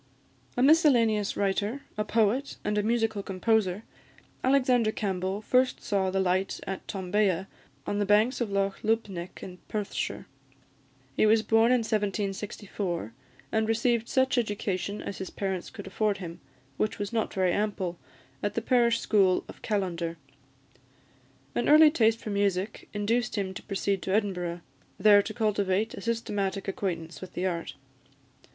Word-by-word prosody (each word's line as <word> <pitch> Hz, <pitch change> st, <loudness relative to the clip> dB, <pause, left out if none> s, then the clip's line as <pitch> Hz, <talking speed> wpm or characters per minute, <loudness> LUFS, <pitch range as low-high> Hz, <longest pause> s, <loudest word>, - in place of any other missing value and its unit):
A 250 Hz, -, +3 dB
miscellaneous 240 Hz, -9 st, +4 dB
writer, 205 Hz, +6 st, 0 dB
a 210 Hz, -, 0 dB
poet, 225 Hz, +5 st, +1 dB
and 210 Hz, 0 st, 0 dB
a 210 Hz, -, +2 dB
musical 225 Hz, -1 st, 0 dB
composer, 200 Hz, 0 st, 0 dB, 0.6 s
Alexander 255 Hz, -4 st, +3 dB
Campbell 195 Hz, -1 st, -2 dB
first 255 Hz, +3 st, +2 dB
saw 195 Hz, -2 st, +1 dB
the 190 Hz, +1 st, 0 dB
light 190 Hz, +1 st, 0 dB
at 195 Hz, -1 st, -5 dB
Tombea, 190 Hz, -1 st, 0 dB, 0.4 s
on 205 Hz, -, -1 dB
the 205 Hz, -, +1 dB
banks 215 Hz, +6 st, +3 dB
of 235 Hz, -, 0 dB
Loch 195 Hz, 0 st, -1 dB
Lubnaig, 205 Hz, -5 st, -2 dB
in 180 Hz, -1 st, -9 dB
Perthshire. 210 Hz, -2 st, -3 dB, 0.9 s
He -, -, +4 dB
was 220 Hz, 0 st, +4 dB
born 225 Hz, +2 st, +4 dB
in 250 Hz, -1 st, +4 dB
1764, 200 Hz, -, -3 dB, 0.4 s
and 220 Hz, 0 st, +1 dB
received 230 Hz, +1 st, +1 dB
such 260 Hz, -1 st, +2 dB
education 205 Hz, -2 st, -2 dB
as 200 Hz, -, -6 dB
his 190 Hz, -, -5 dB
parents 190 Hz, -3 st, -3 dB
could 200 Hz, -, -9 dB
afford 205 Hz, +2 st, 0 dB
him, 170 Hz, -3 st, -7 dB, 0.4 s
which 215 Hz, -, -1 dB
was 205 Hz, +2 st, -4 dB
not 225 Hz, -2 st, 0 dB
very 185 Hz, -2 st, +2 dB
ample, 195 Hz, -4 st, -2 dB, 0.4 s
at 205 Hz, 0 st, -2 dB
the 230 Hz, -, 0 dB
parish 235 Hz, -1 st, +3 dB
school 190 Hz, -4 st, +3 dB
of -, -, -12 dB
Callander. 175 Hz, -5 st, -2 dB, 1.4 s
An 240 Hz, -, 0 dB
early 305 Hz, +1 st, +8 dB
taste 225 Hz, -6 st, +3 dB
for 215 Hz, -, -5 dB
music 200 Hz, 0 st, -1 dB
induced 225 Hz, +3 st, 0 dB
him 190 Hz, -2 st, -2 dB
to -, -, -7 dB
proceed 195 Hz, -1 st, -1 dB
to 190 Hz, -, -3 dB
Edinburgh, 180 Hz, -4 st, -1 dB, 0.4 s
there 205 Hz, +1 st, +7 dB
to 215 Hz, -, -6 dB
cultivate 210 Hz, -2 st, 0 dB
a -, -, -7 dB
systematic 205 Hz, -4 st, -2 dB
acquaintance 175 Hz, -4 st, -4 dB
with 185 Hz, -1 st, -9 dB
the 180 Hz, -, -2 dB
art. 170 Hz, -3 st, -3 dB
205 Hz, 150 wpm, -28 LUFS, 190-225 Hz, 1.4 s, early